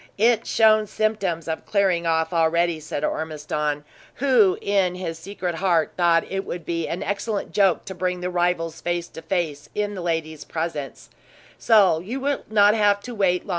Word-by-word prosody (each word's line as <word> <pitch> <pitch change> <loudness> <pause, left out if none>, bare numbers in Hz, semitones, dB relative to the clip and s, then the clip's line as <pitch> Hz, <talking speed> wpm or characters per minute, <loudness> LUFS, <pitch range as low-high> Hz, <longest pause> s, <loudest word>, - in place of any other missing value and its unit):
"It 225 +1 +3
shown 215 -1 +4
symptoms 195 -7 -1
of 160 -1 -3
clearing 190 -5 +1
off, 160 +1 +1
already," 170 0 +2
said 150 -1 -5
Ormiston, 150 -1 -2 0.3
who, 245 -8 +3
in 195 -3 +1
his 165 -3 -5
secret 180 0 -4
heart, 170 -2 +1
thought 170 -2 +3
it 195 0 -3
would 175 -3 -6
be 165 -1 -2
an 170 - -3
excellent 200 +1 -3
joke 195 -4 +2
to 190 - -6
bring 180 0 -2
the 180 0 -3
rivals 175 -2 -1
face 175 0 -2
to 160 - -10
face 160 -4 -3
in 205 0 -1
the 190 - -6
lady's 160 -3 -3
presence; 160 -4 -5 0.5
"so 195 -8 +4
you 220 +11 -5
will 280 +1 -1
not 205 -1 +5
have 205 -2 +4
long 200 - -18
to 250 - -7
wait." 185 -4 +1
180 Hz, 175 wpm, -23 LUFS, 165-205 Hz, 0.5 s, not